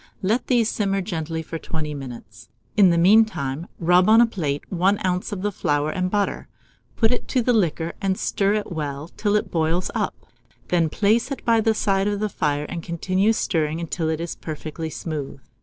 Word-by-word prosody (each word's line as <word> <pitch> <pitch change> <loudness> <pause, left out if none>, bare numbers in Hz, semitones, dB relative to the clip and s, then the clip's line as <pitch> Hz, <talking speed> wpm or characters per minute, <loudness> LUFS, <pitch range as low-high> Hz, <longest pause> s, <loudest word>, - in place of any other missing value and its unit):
Let 220 +6 +1
these 235 -3 +3
simmer 195 -2 0
gently 160 -4 -3
for 165 0 -6
20 155 -2 -4
minutes. 130 -5 -9 0.3
In 200 -3 +6
the 170 - +3
mean 200 +7 +7
time, 160 -7 -4
rub 180 +3 +4
on 225 +1 +7
a 240 - +7
plate 155 -11 -3
1 190 +3 +2
oz. 180 +3 -1
of 205 +1 -2
flour 145 -2 0
and 185 +1 -1
butter; 205 0 -1 0.5
put 225 -1 +3
it 245 - -2
to 255 -3 +1
the 245 - +3
liquor, 170 -6 0
and 190 -2 0
stir 200 +1 +1
it 210 -2 -3
well 150 -1 -4
till 205 +2 -1
it 210 - 0
boils 165 +2 0
up; - - -1 0.5
then 170 -3 +2
place 220 - +2
it 275 - -5
by 230 -1 +4
the 220 0 +2
side 195 -1 +1
of 205 -1 -1
the 215 0 -1
fire, 150 -5 -1
and 170 - -5
continue 185 +5 +1
stirring 160 -7 0
until 165 -1 -2
it 160 -1 -1
is 170 0 -4
perfectly 160 +1 -6
smooth. 150 -4 -5
180 Hz, 195 wpm, -23 LUFS, 160-205 Hz, 0.5 s, mean